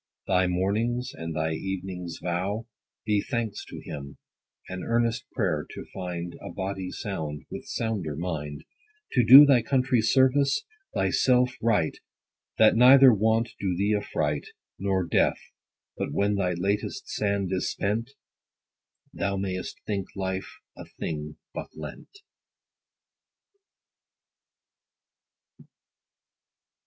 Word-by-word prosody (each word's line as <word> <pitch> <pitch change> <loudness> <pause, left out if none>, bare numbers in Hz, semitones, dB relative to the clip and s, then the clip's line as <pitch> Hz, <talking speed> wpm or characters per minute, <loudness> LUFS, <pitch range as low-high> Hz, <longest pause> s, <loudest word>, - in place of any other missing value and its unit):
90 95 - +1
Thy 90 0 +4
morning's 105 +7 0
and 80 -1 -6
thy 80 +1 0
evening's 90 -1 -5
vow 95 +5 -2 0.4
Be 105 -2 +2
thanks 115 -4 -3
to - - -9
him, 70 -2 -8 0.5
and 95 0 -6
earnest 115 0 0
pray'r 90 - 0
to - - -7
find 90 -2 -5
A - - -7
body 95 0 -4
sound, 80 -10 -5
with - - -7
sounder 105 -10 -2
mind; 75 -4 -4 0.5
To 125 - +3
do 135 +6 +11
thy 135 -4 +5
country 130 -1 +2
service, 135 - +3 0.3
thy - - +1
self 125 0 +3
right; 105 -8 +1 0.6
That 110 - +6
neither 130 +2 +8
want 110 +2 +2
do 95 -3 -1
thee 100 +3 +2
affright, 75 -7 -2 0.3
Nor 95 -2 0
death; - - +2 0.6
but - - -3
when 100 +1 +1
thy 95 -3 0
latest 100 +4 -2
sand 100 -2 -1
is 95 - 0
spent, 110 +5 -1 1.0
Thou 100 0 -1
may'st 95 -1 -4
think 100 -3 -2
life 95 -1 -4 0.2
a - - -9
thing 75 -1 -4 0.2
but - - -6
lent. 80 - -10
100 Hz, 120 wpm, -27 LUFS, 90-115 Hz, 1.0 s, do